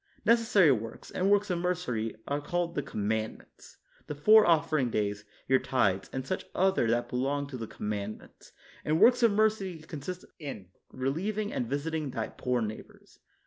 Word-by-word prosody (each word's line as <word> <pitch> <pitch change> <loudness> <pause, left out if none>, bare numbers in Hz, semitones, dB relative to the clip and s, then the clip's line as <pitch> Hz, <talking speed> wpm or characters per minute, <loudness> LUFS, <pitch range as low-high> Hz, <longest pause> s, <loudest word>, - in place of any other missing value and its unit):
Neces 230 +1 +4
sary 190 -10 +6
works, 115 -2 -4
and 190 +2 0
works 205 -1 +3
of 175 - 0
mercy, 160 -12 -2
are 145 +1 -1
called 175 +2 -2
the 145 - -1
Commandments, 110 -4 -4 0.3
the 150 - -4
four 215 +9 +6
offering 155 -5 +2
days, 105 -1 -2 0.2
your 130 0 +4
tithes, 95 -7 0
and 130 -1 -4
such 185 - -3
other 190 -9 +2
that 120 +1 +1
belong 140 +4 -1
to 140 -1 -8
the 115 -2 -5
Com 105 - -5
mandments; 105 0 -7 0.3
and 155 +1 +1
works 245 +4 +6
of 230 -2 +5
mercy 205 -4 +1
consist 160 +3 -7
in 135 - -7 0.2
re 130 +1 -2
lieving 210 +7 -2
and 120 - -2
visiting 150 +1 -2
thy 115 -3 -3
poor 125 -2 -1
neighbors. 110 0 -9
145 Hz, 175 wpm, -29 LUFS, 120-185 Hz, 0.3 s, sary